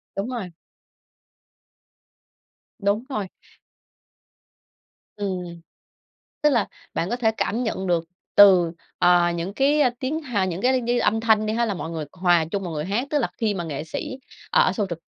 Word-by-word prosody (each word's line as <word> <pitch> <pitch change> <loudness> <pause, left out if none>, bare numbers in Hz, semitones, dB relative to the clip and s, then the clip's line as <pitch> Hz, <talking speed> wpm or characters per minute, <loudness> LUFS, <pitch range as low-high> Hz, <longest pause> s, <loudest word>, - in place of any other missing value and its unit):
Đúng 195 +5 -2
rồi. 230 -8 -5 2.3
Đúng 200 +2 +1
rồi. 210 -8 -3 1.9
Ừm. 180 -4 -4 0.8
Tức 300 - +5
là 235 -6 +2 0.3
bạn 170 - -1
có 240 - 0
thể 225 -3 +2
cảm 230 +5 -1
nhận 190 -5 -2
được 170 -2 +1 0.3
từ, 185 -4 +7 0.3
ờ, 175 -1 +4
những 170 +3 -4
cái, 285 +5 +3
ơ, 255 - +5
tiếng, 280 +5 -2
hà 235 -10 -1
những 180 0 -3
cái 255 +1 +2
như 240 +1 0
âm 225 - +2
thanh 220 -1 +3
đi 215 - -1
ha, 235 +1 +1
là 215 - -1
mọi 170 -3 -5
người 160 -2 -4
hòa 175 -3 +2
chung 200 -1 -2
mọi 175 -3 -5
người 150 0 -3
hát. 215 +8 -1
Tức 295 - +1
là 240 - +1
khi 220 -2 0
mà 185 -3 -3
nghệ 150 -3 -4
sĩ 260 - -5 0.3
ở - - +4
show 210 - -1
trực 165 -1 -7
205 Hz, 175 wpm, -23 LUFS, 175-240 Hz, 2.3 s, từ